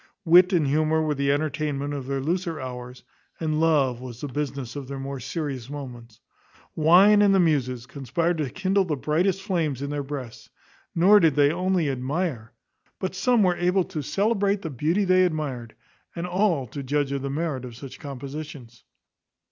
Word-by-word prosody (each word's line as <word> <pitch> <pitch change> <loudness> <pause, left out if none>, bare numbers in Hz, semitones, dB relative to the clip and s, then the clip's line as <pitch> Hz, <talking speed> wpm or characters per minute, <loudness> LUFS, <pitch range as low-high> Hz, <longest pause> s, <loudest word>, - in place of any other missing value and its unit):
Wit 180 +3 +7
and 170 -5 +2
humour 155 +3 +2
were 155 -1 0
the 140 0 0
entertainment 145 -1 -2
of 135 -3 -5
their 135 0 -2
looser 170 +1 -2
hours, 125 -1 -8 0.4
and 155 -2 -1
love 140 -7 +2
was 125 -2 -8
the 145 - -4
business 140 -2 -4
of 140 -2 -6
their 140 0 -6
more 135 0 -5
serious 135 -1 -5
moments. 120 -6 -9 0.6
Wine 185 +7 +6
and 200 -1 +5
the - - +4
muses 130 -8 +1
conspired 155 +6 -2
to 145 -4 -1
kindle 190 +5 +1
the 165 -5 -2
brightest 175 +7 0
flames 165 - -1
in 140 +1 -4
their 145 -1 -2
breasts; 135 -4 -7 0.5
nor 195 +5 +6
did 160 -7 +3
they 145 0 +4
only 180 -1 0
admire, 135 -2 -2 0.5
but 185 - -3
some 235 +3 +2
were 180 -2 +3
able 180 +2 +2
to 170 -4 -5
celebrate 200 - 0
the 165 - -4
beauty 160 - 0
they 185 0 +4
admired, 145 -9 -3 0.4
and 170 0 -3
all 180 -6 +1
to 135 +5 -7
judge 140 +1 -1
of 140 -1 -2
the 140 - -3
merit 145 -2 -2
of 120 -2 -8
such 135 +2 -10
compositions. 140 -3 -8
150 Hz, 180 wpm, -25 LUFS, 135-175 Hz, 0.6 s, Wit